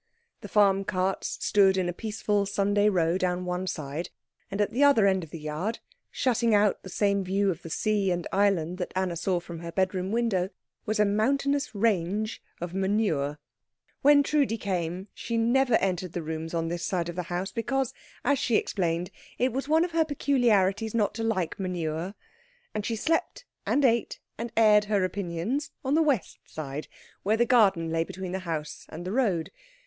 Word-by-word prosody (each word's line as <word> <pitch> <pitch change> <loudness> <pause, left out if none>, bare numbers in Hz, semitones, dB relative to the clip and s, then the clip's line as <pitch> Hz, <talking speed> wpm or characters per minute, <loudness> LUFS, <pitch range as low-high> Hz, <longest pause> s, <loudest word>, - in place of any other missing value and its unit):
The - - -9
farm 195 -2 +4
carts 190 0 -1
stood 195 -2 +4
in 185 -1 +1
a 175 - -2
peaceful 210 0 -1
Sunday 205 +1 +2
row 175 -2 +1
down 180 0 -1
one 180 +1 -2
side, 155 -1 -4 0.4
and 195 - -4
at 205 - +1
the 265 +4 +2
other 280 -8 +6
end 190 -2 +2
of 160 - -10
the 165 - -7
yard, 155 +9 -3 0.3
shutting 235 -4 +2
out 205 0 +3
the 190 - -10
same 200 +1 +1
view 195 +1 +1
of 165 - -6
the 165 - -8
sea 205 +2 +1
and 175 -1 -1
island 185 -3 +1
that 180 - -3
Anna 185 -2 0
saw 175 +2 0
from 170 -1 -8
her 170 0 -6
bedroom 190 +1 0
window, 220 -6 +1 0.4
was 215 +1 0
a 210 - +5
mountainous 275 +6 +1
range 210 0 0 0.2
of 175 0 -5
manure. 190 -7 0 0.6
When 285 0 +6
Trudi 280 -6 +1
came, 185 -2 -3
she 230 -1 -3
never 245 +2 +3
entered 185 -3 0
the 175 - -3
rooms 160 +1 -4
on 165 0 0
this 170 +1 -3
side 175 -3 -1
of 175 - -5
the 180 - -1
house, 180 +2 -2
because, 265 +2 -1 0.3
as 285 -2 +3
she 235 - +1
explained, 175 -3 0 0.3
it 250 -1 +1
was 270 +2 -3
one 320 +2 +4
of 355 - -6
her 325 0 +3
peculiarities 225 -8 +1
not 210 -3 +1
to 225 +1 -4
like 190 -7 -1
manure; 175 0 -3 0.6
and 210 - -2
she 230 - -1
slept 325 - -1 0.2
and 285 - +3
ate 235 -2 +1 0.2
and 230 +1 -5
aired 210 -2 +6
her 205 -2 +1
opinions 185 - -2 0.2
on 265 - +1
the 320 - +4
west 280 - 0
side, 150 -1 -6 0.3
where 215 +3 +1
the 240 - +3
garden 195 -9 +3
lay 165 0 +1
between 185 +2 -6
the 190 - -2
house 160 -4 -5
and 170 +3 -8
the 185 - -3
road. 200 -9 0
195 Hz, 190 wpm, -27 LUFS, 175-225 Hz, 0.6 s, other